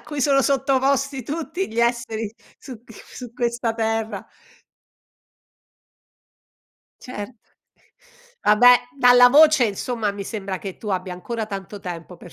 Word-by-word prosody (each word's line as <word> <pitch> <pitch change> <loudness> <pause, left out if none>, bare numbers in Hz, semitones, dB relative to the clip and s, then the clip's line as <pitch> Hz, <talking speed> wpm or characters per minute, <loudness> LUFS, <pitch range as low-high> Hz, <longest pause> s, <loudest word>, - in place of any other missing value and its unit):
a - - -23
cui 295 -2 -5
sono 275 0 +3
sottoposti 275 0 0
tutti 330 +7 -4
gli 230 +1 -1
esseri 235 -3 -1 0.3
su 245 -4 -11
q 225 - -15
su 245 +2 -11
questa 235 -1 -2
terra. 225 0 -2 2.8
Cert 235 -1 -8 1.1
Vabbè, 245 +4 +6 0.2
dalla 245 -1 +7
voce, 300 0 +6
insomma, 210 +1 -3
mi 200 -1 -7
sembra 195 -3 -5
che 195 -2 -8
tu 210 - -8
abbia 185 -1 -3
ancora 220 +5 -5
tanto 200 -1 -8
tempo 175 -1 -8
per 170 -3 -14
235 Hz, 125 wpm, -22 LUFS, 205-260 Hz, 2.8 s, dalla